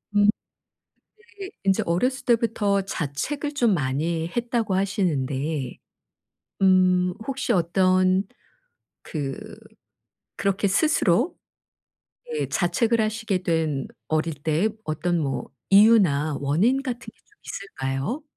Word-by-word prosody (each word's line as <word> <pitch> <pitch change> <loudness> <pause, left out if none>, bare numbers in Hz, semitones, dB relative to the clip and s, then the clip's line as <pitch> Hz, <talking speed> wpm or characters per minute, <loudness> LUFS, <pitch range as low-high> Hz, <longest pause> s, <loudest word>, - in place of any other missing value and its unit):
음. 205 0 +5 1.1
이게 390 -1 -6
인제 195 -1 +2
어렸을 250 +11 0
때부터 225 -4 +2
자책을 195 - -3
좀 240 -7 +2
많이 160 +3 -1
했다고 235 -4 0
하시는데 150 -8 -1 0.9
음 185 -1 +4
혹시 270 -2 -1
어떤 185 +1 +3 0.8
그 140 -4 -4 1.0
그렇게 200 0 0
스스로 245 - +2 1.0
예 455 - -1
자책을 220 +6 +1
하시게 215 -3 -1
된 160 -5 0 0.2
어릴 155 +1 0
때의 160 +8 +1
어떤 170 +2 -1
뭐 135 -4 -2 0.2
이유나 190 -9 +5
원인 190 - +2
같은 250 -3 -4
게 - - -44
좀 420 - -30
있을까요? 170 - -4
185 Hz, 210 characters per minute, -24 LUFS, 155-225 Hz, 1.1 s, 음